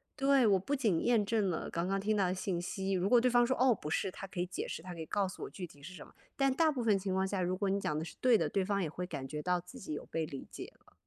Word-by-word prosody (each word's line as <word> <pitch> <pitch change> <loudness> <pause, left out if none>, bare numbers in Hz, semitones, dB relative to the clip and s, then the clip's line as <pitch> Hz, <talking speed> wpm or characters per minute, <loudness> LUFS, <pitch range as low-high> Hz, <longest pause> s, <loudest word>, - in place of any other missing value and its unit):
对， 275 -3 +4
我 200 -2 +5
不 275 +10 -3
仅 220 - +1
验 235 -4 +3
证 205 -2 +1
了 165 - -3
刚 170 +2 -2
刚 195 0 +1
听 215 +2 0
到 195 -3 +2
的 180 - 0
信 185 -1 -2
息， 195 +2 -2
如 185 +1 +1
果 245 - +7
对 250 +1 +3
方 240 0 +5
说： 260 +2 +1
“哦， 250 -2 +5
不 150 - -7
是”， 175 - 0
他 195 - -7
可 190 -1 -7
以 175 - +1
解 185 - -4
释， - - -5
他 180 0 -7
可 165 - -7
以 160 - -5
告 200 +2 0
诉 185 - -8
我 - - -5
具 180 -3 -7
体 145 -2 -18
是 180 +5 -8
什 - - -10
么。 - - -20 0.2
但 275 -1 +3
大 315 +3 +3
部 260 -4 -3
分 215 -3 +3
情 190 0 -2
况 190 0 +1
下， 190 -1 -1
如 180 +1 0
果 200 0 0
你 195 - +1
讲 155 -6 -1
得 160 - -4
是 - - -10
对 250 -3 +6
的， 165 - 0
对 190 +6 0
方 200 +1 0
也 165 - -1
会 180 +4 -5
感 140 -7 -5
觉 150 +2 -4
到 180 +2 +1
自 180 +9 -12
己 195 -10 -8
有 - - -5
被 165 -1 -2
理 140 -3 -8
解 - - -8
了。 - - -23
195 Hz, 365 characters per minute, -33 LUFS, 175-225 Hz, 0.2 s, 果